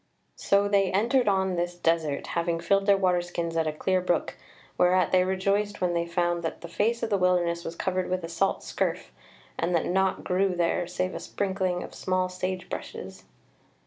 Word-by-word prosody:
So 200 0 +2
they 200 -2 +2
entered 235 +6 +2
on 190 -2 +1
this 175 +1 -1
desert, 165 -4 0
having 170 0 0
filled 195 +4 +1
their 200 -1 +6
water 180 -2 +2
skins 170 -1 -4
at 165 -1 +1
a - - +1
clear 185 +4 0
brook, 175 -2 0 0.4
whereat 180 +1 +3
they 185 -1 +5
rejoiced 200 +2 0
when 180 -1 +1
they 170 0 0
found 175 0 0
that 165 - -4
the 170 - -7
face 225 +7 0
of 230 - -2
the 200 - +2
wilderness 175 -2 +2
was 165 - -6
covered 185 +1 -1
with 185 -1 -1
a - - -3
salt 190 +3 0
scurf, - - -2 0.5
and 170 +2 +1
that 165 - +1
naught 190 +1 +1
grew 185 0 +1
there 175 0 0
save 185 +1 -2
a - - -4
sprinkling 190 -2 -2
of - - -10
small 185 -1 -1
sage 185 0 -4
bushes. - - -7
185 Hz, 195 wpm, -27 LUFS, 170-190 Hz, 0.5 s, their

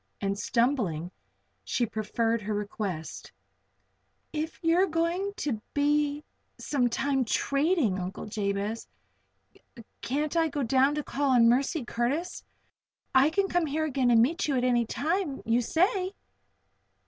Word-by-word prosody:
And 195 0 -1
stumblingly 210 - 0 0.5
she 245 - 0
preferred 225 +1 -1
her 210 0 -3
request: 200 -6 -5 1.0
"If 310 +1 -3
you 330 +1 +3
are 385 - +4
going 340 +4 -1
to 265 - -2
be 295 0 +1 0.3
some 255 -4 0
time 270 +2 0
trading, 275 - +1
Uncle 185 +3 -5
Jabez, 205 +1 -3 1.1
can't 295 +5 -2
I 330 -1 +3
go 290 -2 -2
down 265 +4 +3
to 300 - -2
call 285 0 -1
on 240 -3 +5
Mercy 265 +3 +1
Curtis? 275 +11 -2 0.7
I 265 +3 +5
can 390 +4 +1
come 350 -3 0
here 310 +2 -1
again 265 -4 +1
and 230 -1 +6
meet 320 +8 0
you 280 -3 +1
at 250 - 0
any 240 -2 +2
time 320 - -2
you 230 +2 +2
say." 370 - +1
270 Hz, 135 wpm, -28 LUFS, 230-310 Hz, 1.1 s, and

